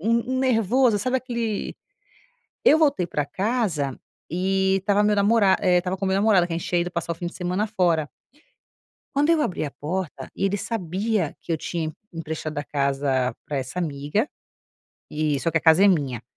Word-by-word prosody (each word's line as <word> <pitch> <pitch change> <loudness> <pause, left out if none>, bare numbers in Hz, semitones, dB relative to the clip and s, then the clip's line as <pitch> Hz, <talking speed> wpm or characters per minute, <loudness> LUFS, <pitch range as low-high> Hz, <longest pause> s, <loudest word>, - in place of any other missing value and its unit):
um, 215 - -2 0.3
um - - 0
nervoso, 245 -1 +3
sabe 255 +5 0
aquele 235 -4 -3 0.9
eu 310 - +6
voltei 280 - +2
pra 150 -4 -1
casa 185 - -1 0.3
e 190 +2 +1
estava 205 +1 +2
meu 210 0 +3
namora 200 -1 +4
e 180 -1 +4
estava 180 +2 -2
com 195 - -4
meu 190 - +1
namorado 195 -4 +4
que 170 - -6
a 165 - -1
gente - - -6
tinha 175 -1 +2
ido 175 - -4
passar 170 0 -3
o - - -5
fim 175 - -5
de 170 - -6
semana 180 +3 -1
fora. 175 -8 +1 1.1
Quando 290 +2 +2
eu 320 - +3
abri 185 - -1
a 140 - -6
porta, 150 -4 -5
ele 195 +1 0
sabia 195 -3 -2
que - - -6
eu 165 - +1
tinha 165 +1 -3
empre 155 - -8 0.2
emprestado 160 -2 -5
a 145 - -1
casa 135 -3 0
pra 145 - -3
essa 130 +6 -4
amiga, 150 - -1 0.8
e 150 -2 0
só 165 - 0
que 165 - +2
a - - -8
casa 160 +5 +5
é - - +7
minha. 140 - 0
180 Hz, 195 wpm, -24 LUFS, 155-210 Hz, 1.1 s, é